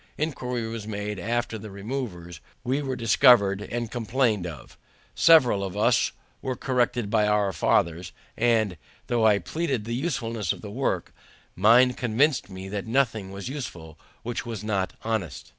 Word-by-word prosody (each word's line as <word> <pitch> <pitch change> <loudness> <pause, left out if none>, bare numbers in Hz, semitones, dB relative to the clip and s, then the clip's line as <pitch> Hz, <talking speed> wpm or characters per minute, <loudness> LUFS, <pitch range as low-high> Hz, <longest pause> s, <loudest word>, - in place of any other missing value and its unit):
Inquiry 125 -6 -2
was 115 -2 -6
made 105 -1 -4
after 115 +2 -2
the 105 +1 -9
removers; 100 -6 -6 0.2
we 135 +4 0
were 135 -2 -3
discovered 115 -4 +5
and 120 +1 -4
complained 115 -5 0
of; 75 -7 -10 0.4
several 130 -12 +5
of 95 -2 -5
us - - +3 0.3
were 130 -1 -2
corrected 120 -4 0
by 105 -1 +3
our 105 -2 +2
fathers; 85 +1 +1 0.2
and, 110 -5 +2 0.3
though 115 -2 +2
I 105 -2 +5
pleaded 130 - -2
the 115 - -3
usefulness 115 - -2
of - - -12
the 105 - -8
work, 135 +5 -2 0.4
mine 120 +6 +5
convinced 125 +2 +1
me 95 0 -8
that 100 +2 -4
nothing 115 -5 0
was 100 +2 -7
useful 85 - -7 0.2
which 120 0 -3
was 115 -4 -6
not 100 -3 -1
honest. 110 - -3
110 Hz, 155 wpm, -26 LUFS, 100-125 Hz, 0.4 s, discovered